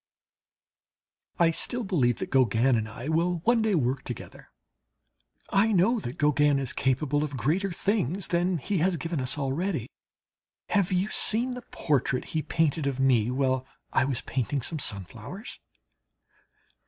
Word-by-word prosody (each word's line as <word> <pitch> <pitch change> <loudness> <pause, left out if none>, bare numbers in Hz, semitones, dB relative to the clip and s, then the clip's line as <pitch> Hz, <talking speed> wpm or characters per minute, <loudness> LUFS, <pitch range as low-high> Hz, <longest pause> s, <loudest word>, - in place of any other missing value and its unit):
I 170 -2 +4
still 245 +8 -2
believe 135 - +2
that - - -5
Gauguin 125 0 +3
and 110 -1 -1
I 120 +4 -8
will 170 +2 +1
one 235 +1 +3
day 215 -3 +2
work 130 -3 0
together. 125 - -8 1.0
I 210 +3 +3
know 215 +5 +3
that 125 -10 -6
Gauguin 150 -1 +3
is 135 -3 -3
capable 140 +2 +1
of 145 -3 -4
greater 170 - 0
things 195 - -1
than 175 +1 +1
he 190 +5 -2
has 175 +2 +2
given 165 -3 -3
us 130 +3 -2
already. 145 - -2 0.8
Have 200 -3 +2
you 185 +3 +1
seen 240 +4 +2
the 250 - -6
portrait 135 -3 0
he 160 - +1
painted 155 -1 0
of 135 -1 -2
me 125 -4 +3
while 130 0 0 0.3
I 130 - +3
was 135 -3 -2
painting 130 +1 -2
some 160 +4 -3
sunflowers? 115 - -6
150 Hz, 150 wpm, -27 LUFS, 130-185 Hz, 1.0 s, I